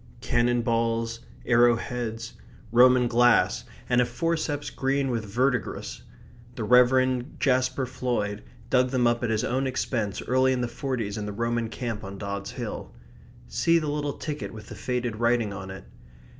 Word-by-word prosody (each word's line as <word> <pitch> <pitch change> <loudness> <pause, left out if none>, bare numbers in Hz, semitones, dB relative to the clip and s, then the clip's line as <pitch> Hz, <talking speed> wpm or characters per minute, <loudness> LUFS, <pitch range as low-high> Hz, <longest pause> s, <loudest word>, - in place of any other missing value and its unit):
Cannon 120 0 +1
balls; 115 0 0 0.3
arrow 120 -1 +5
heads; 115 -1 -5 0.4
Roman 125 +1 +6
glass 120 0 +3 0.2
and 125 0 +3
a - - +3
forceps 150 +3 -2
green 135 0 0
with 115 -2 -2
verdigris. 125 +5 -1 0.5
The 115 - -4
Rev. 125 +3 +3
Jaspar 130 0 +1
Floyd 120 -5 -2 0.3
dug 125 -1 +4
them 125 -1 +1
up 120 0 +2
at 120 - 0
his 110 -1 0
own 130 +2 0
expense 115 -5 -2
early 130 +1 +3
in 125 - -1
the 120 - 0
forties 120 -4 -3
in 105 - -4
the - - -3
Roman 115 +1 -1
camp 115 -3 -4
on 100 0 -7
Dods 100 0 -4
Hill - - -6 0.6
see 165 - +2
the 155 -3 -1
little 145 -1 -2
ticket 150 -1 -5
with 110 -1 -11
the - - -8
faded 125 -3 -2
writing 115 -2 +1
on 95 -1 -7
it. 95 0 -8
120 Hz, 160 wpm, -26 LUFS, 115-130 Hz, 0.6 s, Roman